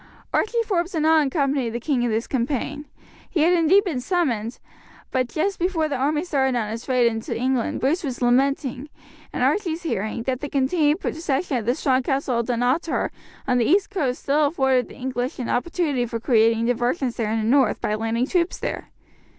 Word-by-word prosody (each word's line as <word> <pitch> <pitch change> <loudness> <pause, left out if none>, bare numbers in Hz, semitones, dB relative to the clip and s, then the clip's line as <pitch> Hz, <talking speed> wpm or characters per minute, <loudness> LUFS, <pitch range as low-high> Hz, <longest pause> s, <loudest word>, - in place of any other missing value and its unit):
Archie 460 +2 +1
Forbes 355 -3 -1
did 315 -3 0
not 315 -2 +4
accompany 275 -3 0
the 235 +1 -4
king 260 0 0
in 240 - +1
this 225 +1 -1
campaign. 275 +3 -2 0.4
He 330 - 0
had 340 +3 +4
indeed 355 +4 +4
been 330 -10 -2
summoned, 250 - -1 0.5
but 255 -1 +1
just 390 +5 -1
before 340 -3 0
the 290 - -2
army 295 +4 0
started 265 -6 +1
on 215 -3 -2
its 230 +4 -6
raid 250 -2 +3
into 225 -1 -1
England 255 0 -1
Bruce 315 +8 +1
was 260 -5 -4
lamenting, 265 +2 +1 0.4
in - - -2
Archie's 345 -4 0
hearing, 225 - -2
that 255 0 -2
the 290 - -5
continued 295 +4 +1
possession 295 -2 -1
of 225 -2 -5
the 245 - +2
strong 265 -3 +1
castle 265 -2 -1
of 235 - -2
Dunottar 250 +7 0 0.4
on 250 -1 +2
the 235 - +2
east 395 - +2
coast 275 -10 -2
still 290 +1 +3
afforded 265 -4 +1
the - - -13
English 255 +1 -3
an 245 - -4
opportunity 285 -2 0
for 230 0 -4
creating 225 -1 +3
diversions 245 +2 -1
in 220 0 0
the 220 - -1
north, 255 -1 +3
by 210 - -1
landing 225 +3 0
troops 345 +3 0
there. - - -5
265 Hz, 190 wpm, -23 LUFS, 240-315 Hz, 0.5 s, not